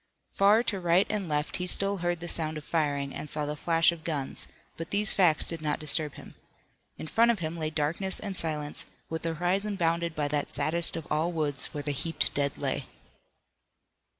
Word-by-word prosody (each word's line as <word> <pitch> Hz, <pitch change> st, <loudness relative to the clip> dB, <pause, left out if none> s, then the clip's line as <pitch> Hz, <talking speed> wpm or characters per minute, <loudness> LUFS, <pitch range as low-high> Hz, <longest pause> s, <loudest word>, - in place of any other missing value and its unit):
Far 205 Hz, +4 st, +5 dB
to 205 Hz, -5 st, -1 dB
right 175 Hz, +2 st, +3 dB
and 200 Hz, -5 st, -2 dB
left 150 Hz, 0 st, -1 dB
he 180 Hz, 0 st, -3 dB
still 200 Hz, +2 st, +2 dB
heard 175 Hz, -1 st, -1 dB
the 175 Hz, -, -5 dB
sound 160 Hz, -2 st, 0 dB
of 150 Hz, -, -7 dB
firing 145 Hz, -4 st, 0 dB
and 150 Hz, -, -6 dB
saw 150 Hz, -1 st, 0 dB
the 150 Hz, +1 st, -3 dB
flash 165 Hz, +2 st, +3 dB
of 165 Hz, -2 st, -9 dB
guns, 150 Hz, -5 st, -1 dB, 0.3 s
but 165 Hz, +1 st, -6 dB
these 205 Hz, 0 st, +1 dB
facts 175 Hz, -5 st, +4 dB
did 165 Hz, -2 st, -4 dB
not 150 Hz, -1 st, 0 dB
disturb 155 Hz, -1 st, 0 dB
him. -, -, -11 dB, 0.6 s
In -, -, -6 dB
front 230 Hz, +8 st, +3 dB
of 235 Hz, -, +3 dB
him 165 Hz, -2 st, -4 dB
lay 155 Hz, -2 st, -2 dB
darkness 160 Hz, +6 st, 0 dB
and 200 Hz, -3 st, -5 dB
silence, 150 Hz, -3 st, 0 dB, 0.2 s
with 160 Hz, -, -2 dB
the 165 Hz, -1 st, -2 dB
horizon 195 Hz, +5 st, 0 dB
bounded 170 Hz, -1 st, 0 dB
by 150 Hz, -1 st, 0 dB
that 145 Hz, -1 st, -1 dB
saddest 160 Hz, +5 st, +1 dB
of 165 Hz, -2 st, -5 dB
all 155 Hz, +3 st, +1 dB
woods 150 Hz, -5 st, -1 dB
where 145 Hz, -, -6 dB
the 145 Hz, -, 0 dB
heaped 165 Hz, +4 st, 0 dB
dead 140 Hz, 0 st, -1 dB
lay. -, -, -2 dB
165 Hz, 205 wpm, -28 LUFS, 150-180 Hz, 0.6 s, Far